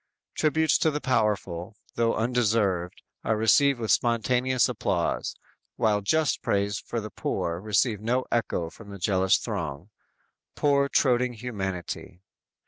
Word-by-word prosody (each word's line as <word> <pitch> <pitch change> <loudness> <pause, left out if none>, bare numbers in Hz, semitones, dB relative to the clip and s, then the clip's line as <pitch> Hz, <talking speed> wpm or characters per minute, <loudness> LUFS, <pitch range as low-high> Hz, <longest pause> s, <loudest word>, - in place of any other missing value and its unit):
Tributes 155 0 +2
to 160 - +3
the 150 -1 -2
powerful, 105 - -1 0.2
though 115 -1 +1
undeserved, 110 -6 0 0.2
are 110 - +1
received 120 +5 +4
with 110 -3 -1
spontaneous 125 +2 +2
applause, 100 -7 -1 0.4
while 105 -2 +1
just 155 +9 +1
praise 100 0 0
for 115 - -4
the 110 -1 -7
poor 85 -1 -2
receive 105 +1 +1
no 125 +4 0
echo 90 -8 -1
from 110 -3 -13
the 100 - -8
jealous 95 0 +2
throng. 90 - -5 0.6
Poor, 140 -1 +2
toadying 125 -3 +2
humanity! 95 -6 -5
110 Hz, 130 wpm, -26 LUFS, 100-125 Hz, 0.6 s, received